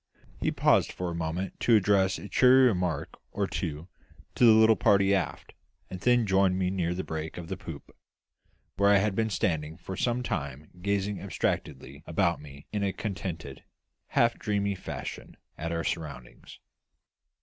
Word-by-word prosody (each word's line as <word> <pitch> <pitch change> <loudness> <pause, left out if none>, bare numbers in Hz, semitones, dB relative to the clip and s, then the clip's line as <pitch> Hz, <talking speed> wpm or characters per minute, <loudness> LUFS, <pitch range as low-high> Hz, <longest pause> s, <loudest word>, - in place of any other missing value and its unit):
He - - 0
paused - - +3
for 90 -1 -4
a - - -4
moment 85 +3 -4
to 115 - +4
address 95 -2 +3
a - - -8
cheery 130 +5 +6
remark 90 - -1
or - - -1
two 75 +2 -4 0.5
to - - 0
the 115 - +9
little 110 0 +6
party 100 0 +3
aft, 95 -5 -2 0.4
and 95 - -5
then 120 +2 +3
joined 95 -1 +3
me 95 -1 0
near 90 -2 -1
the 95 - -3
break 80 0 -5
of 85 -1 -7
the 95 - -2
poop, 80 -6 -10 0.8
where 100 +1 +4
I 100 - +6
had 100 +1 +1
been 110 +2 0
standing 80 -6 -1
for 95 +2 -7
some 120 +4 0
time 70 - -4
gazing 100 +1 -1
abstractedly 70 -6 -3
about 85 -1 +1
me 70 -1 -12
in 105 - -2
a 100 -1 0
contented, 90 -9 -5 0.4
half 115 0 +2
dreamy 100 -2 0
fashion 95 - -7 0.2
at 85 +1 -4
our 85 0 -2
surroundings. 70 -7 -6
95 Hz, 165 wpm, -28 LUFS, 80-100 Hz, 0.8 s, the